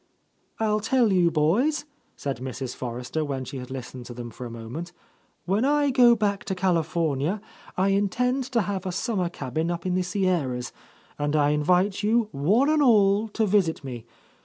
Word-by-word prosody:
"I'll 215 -1 +1
tell 230 -1 +2
you, 175 -2 +4
boys," 195 - +1 0.3
said 140 -3 -4
Mrs. 130 0 -5
Forrester, 125 +5 -4
when 135 -3 -3
she 135 - -7
had 125 -1 -7
listened 125 -1 -7
to 120 - -8
them 120 -1 -7
for 125 +3 -7
a - - -8
moment, 115 +10 -7 0.5
"when 195 +5 +1
I 290 0 +3
go 245 -2 +6
back 205 -2 -1
to 190 - -2
California, 165 -2 0 0.4
I 190 +2 +2
intend 250 +7 +1
to 245 -2 0
have 190 -1 -3
a - - -1
summer 185 -2 -1
cabin 160 +1 -3
up 175 0 -3
in 185 - 0
the 185 - +1
Sierras, 175 -10 -1 0.5
and 145 +1 0
I 145 -1 +3
invite 180 +7 +2
you, 220 +1 +2
one 200 - +2
and 310 -1 +3
all, 210 -4 +4
to 220 +1 0
visit 185 -7 +1
me. 120 -4 -7
180 Hz, 180 wpm, -25 LUFS, 140-210 Hz, 0.5 s, go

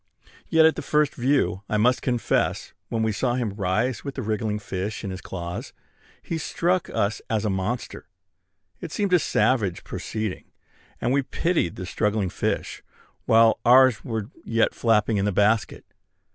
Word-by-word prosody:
Yet 160 0 +5
at 160 - +2
first 150 -1 +2
view, 130 -7 +1
I 105 - +1
must 125 +4 +3
confess, 120 -3 0 0.2
when 115 -1 -1
we 110 - +1
saw 120 +4 0
him 120 -5 -2
rise 105 +5 -1
with 140 -1 -6
a 130 - -2
wriggling 110 0 -1
fish 105 +1 -4
in 100 - -4
his 95 0 -6
claws, 85 -1 -6 0.5
he 165 - -3
struck 175 +3 0
us 100 +2 -1
as 110 -1 0
a 105 - +1
monster. 95 +6 -3 0.7
It - - -7
seemed 200 -3 -1
a 180 - +6
savage 110 - +1
proceeding, 110 -4 -4 0.5
and 120 +2 0
we 140 - +3
pitied 155 - -1
the 90 - -6
struggling 105 0 -1
fish, - - -2 0.5
while 115 0 +5
ours 125 -2 +6
were 110 0 -4
yet 115 0 +1
flapping 110 -2 +2
in 100 - +1
the 105 - +1
basket. 105 +1 +1
110 Hz, 160 wpm, -24 LUFS, 105-130 Hz, 0.7 s, a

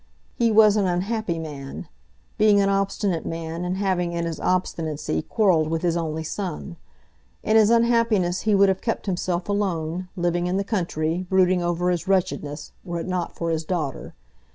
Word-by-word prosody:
He 235 -2 +2
was 215 -1 +6
an 200 -2 +2
unhappy 185 +1 -1
man; 150 -1 -7 0.5
being 210 -1 +5
an 200 0 +3
obstinate 195 -3 0
man, 165 +1 -4
and 180 +1 -2
having 185 -3 0
in 170 0 -2
his 165 -2 -4
obstinacy 160 - -1
quarrelled 180 - +2
with 165 +1 -2
his 170 -1 +1
only 160 -1 -2
son. 170 +1 -5 0.7
In 215 - +1
his 220 -1 +6
unhappiness 230 -6 +2
he 215 -2 +2
would 200 0 +5
have 190 -1 0
kept 230 - -2
himself 180 -2 -2
alone, 185 -4 -2
living 175 0 0
in 180 +2 0
the 200 - 0
country, 175 -3 -2
brooding 185 -1 +3
over 175 +1 0
his 175 +1 -2
wretchedness, 170 -6 -1
were 170 -2 -4
it - - -6
not 180 -2 -3
for 170 -1 -2
his 160 0 -1
daughter. 155 -6 -4
180 Hz, 175 wpm, -24 LUFS, 165-200 Hz, 0.7 s, was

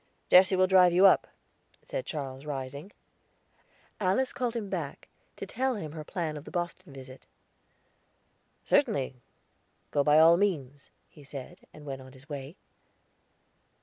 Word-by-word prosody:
"Jesse 185 +1 +7
will 185 0 +4
drive 185 -2 +5
you 185 +3 +6
up," 195 - +5 0.6
said - - -5
Charles, 135 -2 -5
rising. 140 +4 -6 1.1
Alice 200 +7 +1
called 245 -2 -2
him 220 -3 -3
back, - - -5 0.3
to - - -6
tell 260 0 -1
him 160 -8 -6
her 155 0 -7
plan 155 -1 -4
of 145 - -9
the - - -11
Boston 175 -1 -4
visit. 130 -1 -12 1.4
"Certainly; 135 - +1 0.7
go 145 - +2
by 150 +1 +5
all 165 +2 +7
means," 145 -8 -2 0.2
he 150 - -17
said, 135 -2 -10
and 150 - -14
went 135 -2 -6
on 130 0 -13
his 135 +2 -16
way. 145 +1 -7
155 Hz, 145 wpm, -29 LUFS, 140-190 Hz, 1.4 s, Jesse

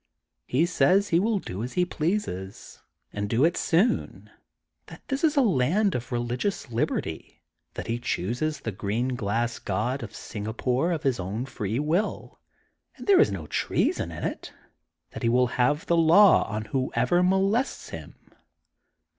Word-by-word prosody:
He 140 +7 +2
says 185 +3 +3
he 170 - +3
will 215 +2 +1
do 100 - -6
as 125 +2 -5
he 180 -1 +2
pleases, 155 - -4 0.3
and 105 0 -3
do 120 +7 +3
it 170 - +2
soon, 195 +9 0 0.6
that - - -13
this 270 +2 -2
is 310 -2 +2
a 275 - +6
land 190 - +2
of 125 0 -4
religious 120 +6 -2
liberty, 115 - -3 0.3
that - - -5
he 115 +1 -2
chooses 125 - -2
the 110 - -3
green 105 +6 -2
glass 115 0 -1
god 120 +8 -2
of 110 -3 -8
Singapore, 125 +8 -2
of 165 -2 -2
his 135 -6 +1
own 100 +7 -3
free 110 -5 -3
will, 160 +9 -1 0.6
and - - -10
there 400 -2 +6
is - - +3
no 90 -6 -5
treason - - -1
in - - -7
it, - - -4 0.6
that - - -8
he 115 - +2
will 125 +2 +4 0.2
have 145 +5 +2
the 170 - +2
law 170 +5 +6
on 110 0 -3
whoever 130 +5 +1
molests 195 +7 +1
him. - - -9
130 Hz, 160 wpm, -26 LUFS, 115-180 Hz, 0.6 s, a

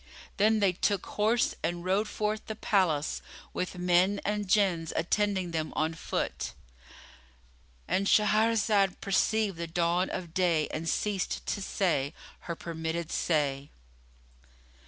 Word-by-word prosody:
Then 215 +1 +3
they 195 -2 +4
took 200 +2 0
horse 220 +3 +1
and 175 0 -2
rode 195 +3 +1
forth 215 +1 -2
the 220 - -4
palace, 180 -9 +1 0.3
with 180 0 -3
men 180 +3 +3
and 210 0 -1
Jinns 185 -5 +2
attending 190 0 0
them 160 -1 -2
on 160 +1 0
foot,——And 60 - -6
Shahrazad 210 -2 +3
perceived 205 0 +1
the 170 0 -4
dawn 170 +2 +1
of 170 -3 -5
day 175 -5 +2
and 165 +1 -3
ceased 200 0 -1
to 200 - -2
say 165 -7 0 0.2
her 170 - -5
permitted 165 0 -4
say. 145 -4 0
180 Hz, 120 wpm, -29 LUFS, 160-205 Hz, 0.3 s, they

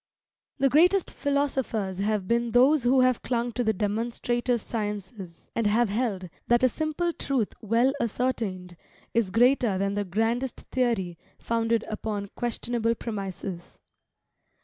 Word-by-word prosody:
The 275 -1 +3
greatest 350 +8 +4
philosophers 265 -9 -1
have 205 -1 0
been 235 0 0
those 265 +5 +5
who 255 +2 +4
have 255 -2 +3
clung 240 -1 -1
to 245 +2 -1
the 220 - +2
demonstrative 235 +4 -1
sciences, 205 -5 -6
and 230 -2 +1
have 220 +2 +3
held 205 -4 -1 0.2
that 240 +1 +3
a 255 - +6
simple 315 +5 -1
truth 260 -9 -1
well 230 +5 +2
ascertained, 205 -7 -2 0.4
is 230 -4 +2
greater 235 -1 +3
than 195 +1 0
the 205 0 -1
grandest 225 +7 -1
theory 205 -10 0 0.2
founded 230 -1 0
upon 210 -2 -4
questionable 235 -1 -1
premises. 195 -5 -6
230 Hz, 130 wpm, -27 LUFS, 205-250 Hz, 0.4 s, a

